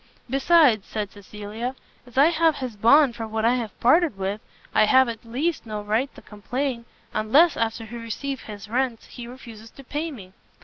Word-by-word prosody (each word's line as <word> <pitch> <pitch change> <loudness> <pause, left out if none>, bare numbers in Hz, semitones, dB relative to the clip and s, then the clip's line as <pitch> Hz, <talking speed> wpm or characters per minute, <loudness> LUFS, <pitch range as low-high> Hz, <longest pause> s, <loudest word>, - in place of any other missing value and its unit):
"Besides," 270 - +4
said 210 -2 -4
Cecilia, 210 +5 -6 0.3
"as 245 - -15
I 295 +5 +6
have 325 -1 +3
his 255 -5 -5
bond 240 +4 +5
for 225 -1 -5
what 220 0 -2
I 235 - +4
have 230 -5 -4
parted 315 - +3
with, 195 +2 -3 0.3
I - - +5
have, 260 +4 +5
at 230 -2 -6
least, 265 +5 -2
no 210 -1 -4
right 220 +6 0
to - - -14
complain, 240 +4 -4 0.3
unless, 275 +11 +4
after 225 0 -2
he 235 +2 -8
receives 245 +4 -5
his 210 0 -9
rents, 245 0 -1
he 240 -1 -10
refuses 230 -3 -11
to 275 - -14
pay 295 +5 -3
me." 195 -11 -11
235 Hz, 185 wpm, -24 LUFS, 215-270 Hz, 0.3 s, I